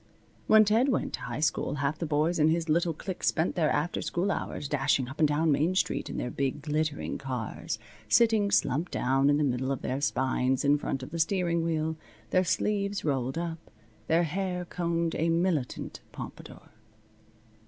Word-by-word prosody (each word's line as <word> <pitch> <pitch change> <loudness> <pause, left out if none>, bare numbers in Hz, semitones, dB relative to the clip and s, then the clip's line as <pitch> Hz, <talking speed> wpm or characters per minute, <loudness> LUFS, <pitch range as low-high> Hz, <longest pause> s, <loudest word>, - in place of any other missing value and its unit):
When 220 0 +7
Ted 225 +6 +3
went 255 - 0
to - - -3
high 120 +4 -5
school 155 - 0
half 145 +2 -1
the 165 - -2
boys 155 +3 +1
in 150 - +5
his 165 +1 +1
little 170 +2 +2
clique 185 +3 -6
spent 160 +2 +1
their 160 -4 +1
after 150 +4 0
school 185 +3 -1
hours 150 - -3
dashing 140 -2 +1
up 140 +4 -9
and 155 - +5
down 150 +2 +2
Main 160 +6 +2
street - - 0
in - - -5
their 125 - -3
big, 140 +1 -2
glittering 155 0 -2
cars, 130 -5 -4 0.3
sitting 220 - +4
slumped 150 -1 +1
down 135 +2 +2
on 145 - +4
the 150 - +1
middle 130 -1 0
of 135 - -3
their 135 +2 -2
spines 130 -1 +1
in 145 +1 +4
front 135 -2 -3
of 130 - -8
the 165 - -4
steering 170 -1 +1
wheel, 160 -1 -1 0.3
their 185 - +4
sleeves 200 +1 0
rolled 135 -1 -1
up, 170 -1 -3 0.5
their 165 +2 +3
hair 180 +2 -2
combed 170 -1 -1
a 165 +2 0
militant 165 -6 -1
pompadour. - - -10
160 Hz, 185 wpm, -28 LUFS, 140-175 Hz, 0.5 s, When